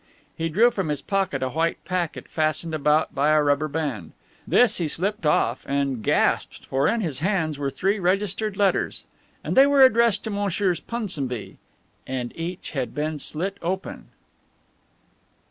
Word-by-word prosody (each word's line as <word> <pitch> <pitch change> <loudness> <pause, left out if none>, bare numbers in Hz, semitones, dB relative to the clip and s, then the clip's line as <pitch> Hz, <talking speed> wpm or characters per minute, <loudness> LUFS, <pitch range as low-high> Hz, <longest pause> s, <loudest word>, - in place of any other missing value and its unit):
He 165 0 -2
drew 225 +9 +4
from 190 -8 -2
his 150 -2 -3
pocket 190 -9 -1
a 130 - -1
white 165 +3 0
packet, 180 -3 -3
fastened 155 +1 -1
about 150 +1 +2
by 145 +2 +2
a 155 -1 +4
rubber 145 +1 +2
band. 140 - -4 0.3
This 245 -5 +4
he 170 - 0
slipped 185 +2 -1
off 125 -4 +1
and 140 -3 0
gasped, - - 0
for 135 +1 +1
in 230 0 +1
his 155 -10 -3
hands 160 -4 -1
were 140 -1 -1
three 195 +9 0
registered 195 +2 -1
letters, 200 -2 +1 0.4
and - - -2
they 270 +1 +7
were 280 -2 +7
addressed 230 -4 +3
to 220 - -4
Messrs. 200 -3 0
Punsonby, 155 - -4 0.5
and 125 -2 -4
each 170 +2 -5
had 130 -6 -3
been 150 0 -2
slit 190 +8 -3
open. 185 +3 -4
165 Hz, 160 wpm, -24 LUFS, 145-195 Hz, 0.5 s, they